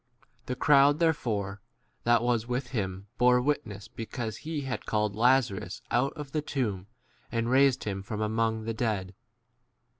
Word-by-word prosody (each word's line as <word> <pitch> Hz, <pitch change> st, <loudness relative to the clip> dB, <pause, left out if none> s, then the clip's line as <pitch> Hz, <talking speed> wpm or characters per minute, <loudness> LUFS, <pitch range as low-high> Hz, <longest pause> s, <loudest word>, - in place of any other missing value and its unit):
The 125 Hz, -, -2 dB
crowd 145 Hz, +1 st, +5 dB
there 165 Hz, -1 st, +4 dB
fore 100 Hz, -7 st, -3 dB, 0.4 s
that 120 Hz, -1 st, +4 dB
was 120 Hz, -2 st, +1 dB
with 125 Hz, +2 st, -2 dB
him 95 Hz, -5 st, -3 dB
bore 125 Hz, 0 st, +5 dB
witness 115 Hz, -7 st, -2 dB
because" 115 Hz, -1 st, -5 dB
he 155 Hz, -1 st, -4 dB
had 135 Hz, -2 st, -4 dB
called 105 Hz, -2 st, 0 dB
Lazarus 115 Hz, -6 st, +2 dB
out 125 Hz, +3 st, +2 dB
of 145 Hz, -3 st, -8 dB
the 155 Hz, -, 0 dB
tomb, 105 Hz, -11 st, -2 dB, 0.4 s
and 115 Hz, 0 st, 0 dB
raised 135 Hz, -1 st, +4 dB
him 100 Hz, -2 st, -3 dB
18 -, -, -8 dB
from 105 Hz, +2 st, -4 dB
among 110 Hz, +1 st, 0 dB
[the] 115 Hz, +1 st, -2 dB
dead. 105 Hz, -5 st, -2 dB
115 Hz, 160 wpm, -29 LUFS, 105-130 Hz, 0.4 s, crowd